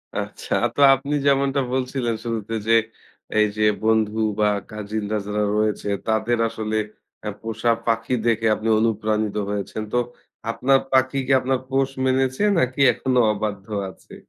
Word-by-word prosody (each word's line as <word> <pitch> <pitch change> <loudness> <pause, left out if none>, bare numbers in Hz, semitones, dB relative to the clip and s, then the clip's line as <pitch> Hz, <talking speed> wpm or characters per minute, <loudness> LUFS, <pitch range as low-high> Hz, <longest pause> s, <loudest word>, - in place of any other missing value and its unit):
আচ্ছা, - - -4
আ - - +4
তো 145 - 0
আপনি 140 +3 -4
যেমনটা 140 0 +2
বলছিলেন 130 -3 -1
শুরুতে 115 -1 -3
যে, 115 - +4 0.6
এই 105 - +5
যে 105 - +1 0.2
বন্ধু 110 -1 +2 0.2
বা 105 - +4 0.2
কাজিনরা 105 0 -3
যারা 105 0 0
রয়েছে, 105 -1 0 0.2
তাদের 110 +2 +1
আসলে 110 -1 -4 0.5
অ্যা 105 - -4
পোষা 115 +1 0
পাখি 115 +1 0
দেখে 115 -1 +1
আপনি 110 +1 -5
অনুপ্রাণিত 110 -1 0
হয়েছেন। 105 +1 -3
তো - - +2 0.5
আপনার 135 +4 +3
পাখি 130 +1 +2
কি, - - 0
আপনার 130 0 0
পোষ 135 0 +1 0.2
মেনেছে 130 +5 +1
নাকি 130 -1 0
এখনও 125 0 +1
অবাধ্য 105 -1 -4 0.2
আছে? - - -15
115 Hz, 145 wpm, -22 LUFS, 110-130 Hz, 0.6 s, এই